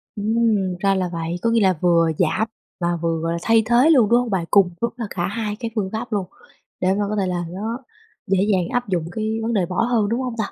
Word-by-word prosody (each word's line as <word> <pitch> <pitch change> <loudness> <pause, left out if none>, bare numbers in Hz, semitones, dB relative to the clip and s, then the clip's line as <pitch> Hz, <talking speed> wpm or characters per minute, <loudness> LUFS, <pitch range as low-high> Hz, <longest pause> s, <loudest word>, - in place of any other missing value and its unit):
Ừm, 215 -3 +1
ra 195 -1 +2
là 185 -2 -1
vậy, 165 0 -3
có 230 - +1
nghĩa 230 -1 +3
là 190 -1 +4
vừa 170 -2 +3
giảm 180 +6 +1 0.3
và 175 -1 0
vừa 165 -1 0
gọi 165 0 -1
là 170 - -2
thay 225 +2 +3
thế 240 +6 +4
luôn, 250 -10 +5
đúng 240 - +5
hông 245 -1 -2
bạn? 190 -5 -1
Cùng 195 -3 +5
lúc 235 - -1
là 235 - -3
cả 175 -2 -2
2 210 0 -3
cái 230 -2 -4
phương 200 -4 -1
pháp 230 +2 -5
luôn, 200 -3 0 0.6
để 185 +1 +3
mà 205 +1 0
có 215 - -1
thể 195 -3 0
là 175 -1 -2
nó 215 +6 -4 0.5
dễ 195 0 +2
dàng 180 -3 +1
áp 245 -3 -1
dụng 175 -4 0
cái 220 +2 -2
vấn 230 +1 -1
đề 195 -5 +2
bỏ 180 +4 -1
hơn, 230 -4 +1
đúng 235 +3 -1
hông 250 -3 -3
ta? 215 - -2
205 Hz, 265 wpm, -21 LUFS, 180-230 Hz, 0.6 s, luôn